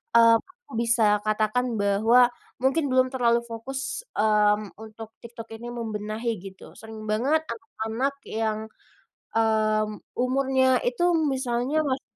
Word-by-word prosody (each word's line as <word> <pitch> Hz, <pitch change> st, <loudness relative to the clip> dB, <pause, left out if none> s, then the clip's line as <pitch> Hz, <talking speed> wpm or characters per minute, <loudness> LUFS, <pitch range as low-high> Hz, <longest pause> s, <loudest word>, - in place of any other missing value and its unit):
mmm, 230 Hz, 0 st, +7 dB
aku 480 Hz, +5 st, -19 dB
bisa 230 Hz, -3 st, +3 dB
katakan 215 Hz, +3 st, 0 dB
bahwa 220 Hz, +4 st, +4 dB, 0.3 s
mungkin 280 Hz, +4 st, +2 dB
belum 255 Hz, -1 st, +3 dB
terlalu 235 Hz, -2 st, +2 dB
fokus, 270 Hz, -, -5 dB
mmm, 210 Hz, -1 st, +2 dB
untuk 220 Hz, 0 st, -10 dB, 0.2 s
TikTok 230 Hz, -1 st, -9 dB
ini 235 Hz, +2 st, -9 dB
membenahi, 220 Hz, 0 st, -3 dB
gitu. 190 Hz, -1 st, -11 dB
Sering 220 Hz, 0 st, -10 dB
banget 270 Hz, +9 st, +2 dB
anak-anak 230 Hz, +3 st, -3 dB
yang, 220 Hz, -1 st, -1 dB, 0.8 s
mmm, 215 Hz, -1 st, +1 dB, 0.2 s
umurnya 260 Hz, 0 st, +2 dB
itu 245 Hz, +8 st, -1 dB, 0.3 s
misalnya 260 Hz, +3 st, 0 dB
mas 260 Hz, 0 st, -1 dB
230 Hz, 120 wpm, -25 LUFS, 215-255 Hz, 0.8 s, mmm